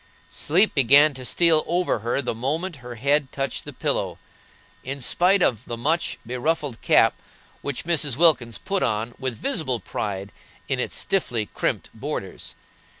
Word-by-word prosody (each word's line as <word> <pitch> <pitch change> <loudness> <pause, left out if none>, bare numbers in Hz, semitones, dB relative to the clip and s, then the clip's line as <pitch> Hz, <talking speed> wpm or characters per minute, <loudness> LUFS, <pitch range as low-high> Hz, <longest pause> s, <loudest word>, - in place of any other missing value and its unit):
Sleep 185 +8 +2
began 140 +3 +6
to 130 -1 -8
steal 160 +3 +3
over 175 -7 0
her 120 +5 -1
the 125 - -1
moment 150 +9 -3
her 120 -2 -9
head 140 +3 +1
touched 135 -1 -3
the - - -7
pillow, - - -2 0.7
in 135 +2 -5
spite 180 +8 +3
of 115 -1 +1
the 120 - -5
much 160 +8 0
beruffled 125 +1 -2
cap - - +4 0.5
which 140 -2 -3
Mrs. 150 -7 +1
Wilkins 130 -9 +4
put 195 - -2
on 115 +1 -1
with 130 -4 -3
visible 155 - -1
pride 100 -2 -4 0.4
in - - -1
its - - -2
stiffly 120 - 0
crimped - - -2
borders. - - -6
140 Hz, 150 wpm, -24 LUFS, 120-165 Hz, 0.7 s, began